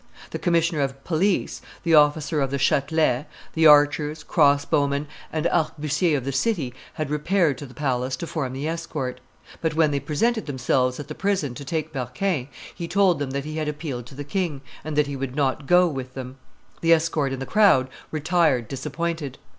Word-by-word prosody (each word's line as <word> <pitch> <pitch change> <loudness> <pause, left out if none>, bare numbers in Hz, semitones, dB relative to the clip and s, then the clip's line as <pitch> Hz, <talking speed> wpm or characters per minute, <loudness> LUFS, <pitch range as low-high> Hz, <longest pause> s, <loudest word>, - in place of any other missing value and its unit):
The - - -4
commissioner 170 -3 +1
of 135 0 -3
police, 180 +4 0 0.2
the 170 -1 +1
officer 150 0 +4
of 135 - 0
the 140 - -1
Chatelet, 140 0 +1 0.3
the 160 0 +5
archers, 150 +1 +4
crossbowmen, 140 -1 +2 0.3
and 155 0 -2
arquebusiers 155 -1 +1
of 130 - -5
the 140 - -1
city 140 - 0 0.2
had 155 -2 -3
repaired 150 -1 +1
to 145 - -7
the 125 - -15
palace 130 -3 -1
to 170 - -5
form 140 -6 -3
the 140 +3 -3
escort; 155 -6 -4 0.4
but 160 -2 -1
when 155 -2 +3
they 140 - 0
presented 220 - 0
themselves 130 -1 0
at 145 - -6
the 155 - -6
prison 190 -8 -1
to 140 - -8
take 155 +2 -3
Berquin, 130 +3 -2 0.3
he 170 -2 -6
told 190 -3 +3
them 145 -2 -2
that 140 +1 -3
he 155 +1 -5
had 155 -1 -2
appealed 145 -5 -4
to 135 - -13
the 145 - -5
king, 155 -2 -2 0.2
and 155 -1 -4
that 150 0 +3
he 140 0 -5
would 135 -1 -4
not 140 -1 0
go 180 0 +5
with 130 -5 -5
them. 130 0 -7 0.4
The 165 0 +5
escort 160 -4 +1
and 135 - -4
the 135 - -4
crowd 195 -12 +4 0.2
retired 155 -6 +1
disappointed. 150 +1 -4
150 Hz, 190 wpm, -24 LUFS, 135-165 Hz, 0.4 s, the